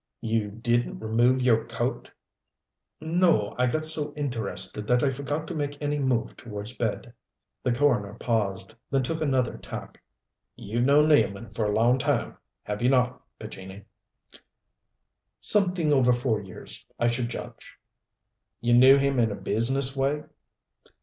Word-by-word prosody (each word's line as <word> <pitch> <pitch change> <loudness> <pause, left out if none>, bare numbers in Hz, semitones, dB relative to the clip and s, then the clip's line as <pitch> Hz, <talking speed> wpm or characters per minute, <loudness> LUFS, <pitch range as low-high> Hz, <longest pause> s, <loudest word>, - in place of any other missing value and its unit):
"You 110 -2 -1
didn't 120 +3 -1
remove 120 +4 +2
your 115 -3 +3
coat?" - - -3 0.9
"No. 160 - +2
I 125 - +3
got 155 +5 -1
so 150 -2 +3
interested 110 -7 -2
that 125 +1 +2
I 140 - +2
forgot 145 +3 -4
to 175 - -5
make 145 -2 -4
any 145 0 -1
move 130 -4 -1
towards 105 +1 -6
bed." 115 +1 -3 0.5
The 125 - 0
coroner 120 -6 +1
paused, 105 -3 -2 0.2
then 135 -1 +1
took 160 +5 -3
another 130 -5 0
tack. - - -9 0.5
"You've 120 +4 -2
known 150 +3 +5
Nealman 110 -7 +2
for 110 - -1
a 105 - 0
long 120 +4 +3
time, - - -1 0.3
have 105 0 -4
you 125 - +3
not, 125 -1 +1 0.2
Pescini?" 100 -2 -9 1.6
"Something 180 -7 +2
over 130 -3 +4
four 120 -3 0
years, 95 -2 -8 0.2
I 120 - +1
should 120 0 -1
judge." 120 - -9 0.8
"You 120 0 +1
knew 130 +3 +8
him 140 -1 +1
in 115 -2 +3
a - - -3
business 130 +7 0
way?" 140 +2 0
125 Hz, 145 wpm, -26 LUFS, 110-140 Hz, 1.6 s, knew